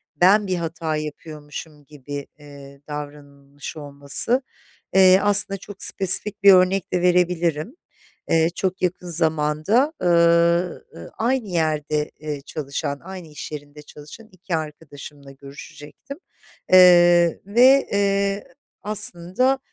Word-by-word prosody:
ben 195 Hz, +6 st, +3 dB
bir 185 Hz, -, -1 dB
hata 165 Hz, -2 st, -4 dB
yapıyormuşum 150 Hz, 0 st, -9 dB
gibi, 145 Hz, -1 st, -9 dB
eee, 140 Hz, -1 st, -14 dB
davranılmış 145 Hz, -1 st, -9 dB
olması. 145 Hz, -, -1 dB, 0.5 s
Eee, 190 Hz, 0 st, +6 dB
aslında 200 Hz, -1 st, +4 dB
çok 195 Hz, 0 st, -9 dB
spesifik 195 Hz, +2 st, +1 dB
bir 200 Hz, -, +8 dB
örnek 185 Hz, +1 st, +2 dB
de 180 Hz, -, 0 dB
verebilirim. 175 Hz, -, 0 dB, 0.5 s
Eee, 165 Hz, 0 st, +2 dB
çok 190 Hz, -1 st, -3 dB
yakın 180 Hz, 0 st, -3 dB
zamanda, 160 Hz, -, 0 dB
ııı, 170 Hz, 0 st, +2 dB
ııı, 85 Hz, -, -11 dB
aynı 240 Hz, 0 st, -1 dB
yerde, 155 Hz, -3 st, -2 dB
eee, 150 Hz, -2 st, -6 dB
çalışan, 140 Hz, -1 st, -5 dB
aynı 185 Hz, -1 st, -10 dB
i̇ş 150 Hz, 0 st, -9 dB
yerinde 145 Hz, 0 st, -10 dB
çalışan 150 Hz, +10 st, -14 dB
2 185 Hz, -1 st, -5 dB
arkadaşımla 145 Hz, -2 st, -9 dB
görüşecektim. 145 Hz, -, -12 dB, 0.5 s
Eee, 175 Hz, -2 st, +5 dB
ve, 255 Hz, +7 st, +4 dB
eee, 200 Hz, 0 st, 0 dB, 0.4 s
aslında, 210 Hz, +5 st, -1 dB
170 Hz, 115 wpm, -21 LUFS, 150-190 Hz, 0.5 s, bir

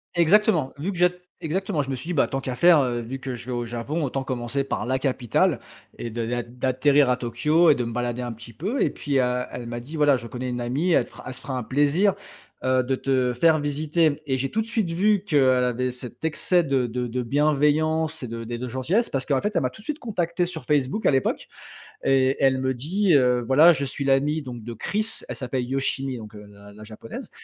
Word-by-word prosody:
Exactement, 170 Hz, -4 st, +3 dB
vu 170 Hz, +8 st, -3 dB
que 180 Hz, -, -7 dB
j'ai 180 Hz, 0 st, +5 dB, 0.3 s
exactement 180 Hz, 0 st, -1 dB
je 135 Hz, -, -5 dB
me 135 Hz, -, -1 dB
suis 145 Hz, +7 st, -8 dB
dit: 180 Hz, -, -2 dB
«Bah, 145 Hz, -, +3 dB
tant 135 Hz, 0 st, -3 dB
qu'à 130 Hz, -1 st, -4 dB
faire, 170 Hz, 0 st, +6 dB
heu, 120 Hz, -2 st, -1 dB
vu 120 Hz, +3 st, -6 dB
que 130 Hz, 0 st, -5 dB
je 120 Hz, 0 st, -8 dB
vais 125 Hz, -, -6 dB
au 120 Hz, -1 st, -2 dB
Japon 120 Hz, +8 st, -3 dB
autant 135 Hz, -1 st, -2 dB
commencer 125 Hz, +2 st, -2 dB
par 135 Hz, -, -3 dB
la 130 Hz, +1 st, 0 dB
capitale 130 Hz, -4 st, +1 dB, 0.4 s
et 120 Hz, -, -5 dB
d 115 Hz, 0 st, -3 dB
d'a 120 Hz, 0 st, -2 dB
d'atterrir 130 Hz, +3 st, +2 dB
à 125 Hz, -, +3 dB
Tokyo 150 Hz, +8 st, +2 dB
et 150 Hz, -, +6 dB
de 125 Hz, -, -2 dB
me 115 Hz, -, -5 dB
balader 120 Hz, 0 st, -2 dB
un 120 Hz, -1 st, -4 dB
petit 115 Hz, +1 st, -12 dB
peu» 200 Hz, -, -2 dB
et -, -, +3 dB
puis, 140 Hz, -2 st, -1 dB
heu, 125 Hz, 0 st, +1 dB
elle 120 Hz, -, -6 dB
m'a 120 Hz, 0 st, -4 dB
dit: 135 Hz, +7 st, -9 dB
«Voilà 145 Hz, -3 st, +4 dB
je 115 Hz, -1 st, -8 dB
connais 125 Hz, +2 st, -5 dB
une 125 Hz, 0 st, -3 dB
amie 140 Hz, +9 st, 0 dB
elle -, -, +4 dB
te -, -, -19 dB
fera -, -, -13 dB
elle 130 Hz, -, -5 dB
se 130 Hz, -, -8 dB
fera 130 Hz, -2 st, -4 dB
un 125 Hz, -, -3 dB
plaisir, 145 Hz, -, +2 dB, 0.5 s
heu, 130 Hz, 0 st, +3 dB
de 130 Hz, +2 st, 0 dB
te 130 Hz, -2 st, 0 dB
faire 155 Hz, +6 st, +4 dB
visiter». 150 Hz, +1 st, 0 dB
Et 130 Hz, -, +1 dB
j'ai 135 Hz, +1 st, -2 dB
tout 220 Hz, -, -1 dB
de -, -, -4 dB
suite 215 Hz, -7 st, -1 dB
vu 200 Hz, +3 st, +2 dB
qu'elle 130 Hz, -8 st, +3 dB
avait 125 Hz, +1 st, 0 dB
cet 125 Hz, +2 st, -10 dB
excès 175 Hz, +3 st, +2 dB
de 135 Hz, -4 st, 0 dB
de 125 Hz, +1 st, -3 dB
de 125 Hz, +2 st, -2 dB
bienveillance 155 Hz, +4 st, +1 dB
et 125 Hz, -, -5 dB
de 115 Hz, 0 st, -6 dB
et 120 Hz, -, -3 dB
de 125 Hz, +2 st, -5 dB
gentillesse 155 Hz, -, 0 dB
parce 135 Hz, -1 st, -2 dB
qu'en 140 Hz, -3 st, +1 dB
fait 210 Hz, +1 st, -2 dB
elle -, -, +3 dB
m'a -, -, 0 dB
tout -, -, -15 dB
suite 295 Hz, +7 st, -5 dB
contacté 175 Hz, -6 st, -1 dB
sur 175 Hz, -3 st, -7 dB
Facebook 145 Hz, +7 st, 0 dB
à -, -, +5 dB
l'époque 135 Hz, -1 st, 0 dB, 0.6 s
et 135 Hz, 0 st, +3 dB
elle 135 Hz, -1 st, +3 dB
me 130 Hz, 0 st, 0 dB
dit: 175 Hz, +9 st, 0 dB
«Heu, 125 Hz, -3 st, +3 dB
voilà 150 Hz, +8 st, +7 dB
je 140 Hz, -2 st, -2 dB
suis 140 Hz, +1 st, -4 dB
l'amie 140 Hz, +3 st, +2 dB
donc 125 Hz, -5 st, -8 dB
de 120 Hz, +1 st, -6 dB
Chris». 215 Hz, -, 0 dB
Elle -, -, -4 dB
s'appelle 130 Hz, 0 st, -2 dB
Yoshimi 135 Hz, -1 st, -2 dB
donc, 110 Hz, -1 st, -10 dB
heu, 105 Hz, -1 st, -11 dB
la 100 Hz, 0 st, -15 dB
la 105 Hz, +1 st, -12 dB
japonaise 110 Hz, +1 st, -9 dB
135 Hz, 245 wpm, -24 LUFS, 125-155 Hz, 0.6 s, voilà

